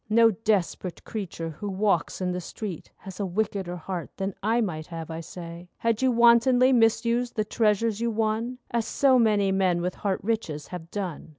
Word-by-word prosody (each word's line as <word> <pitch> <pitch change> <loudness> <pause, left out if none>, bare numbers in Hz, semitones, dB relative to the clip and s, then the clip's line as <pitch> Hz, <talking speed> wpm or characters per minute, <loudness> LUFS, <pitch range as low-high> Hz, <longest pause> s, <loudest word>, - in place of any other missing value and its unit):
No 225 +1 +6
desperate 195 -4 -1
creature 180 -6 -5
who 200 +7 -6
walks 195 -2 0
in 180 -1 0
the 180 0 -3
street 185 -1 -7
Has 190 -1 -10
a 200 - 0
wickeder 190 -2 -2
heart 175 0 -5
than 195 0 -2
I 225 +3 +2
might 160 -8 -2
have, 165 -2 -7
I 160 - -4
say, 170 +1 -9
Had 230 0 0
you 260 -1 +3
wantonly 240 +2 +5
misused 235 +1 +2
the 215 - 0
treasures 220 0 +1
you 235 - +1
won— 225 +2 -1
As 235 -1 0
so 265 -2 +4
many 210 -4 +3
men 185 -2 +2
with 180 +1 -2
heart 195 -2 -2
riches 195 -9 -2
have 170 -2 -7
done. 185 -6 -5
205 Hz, 185 wpm, -26 LUFS, 180-230 Hz, -, No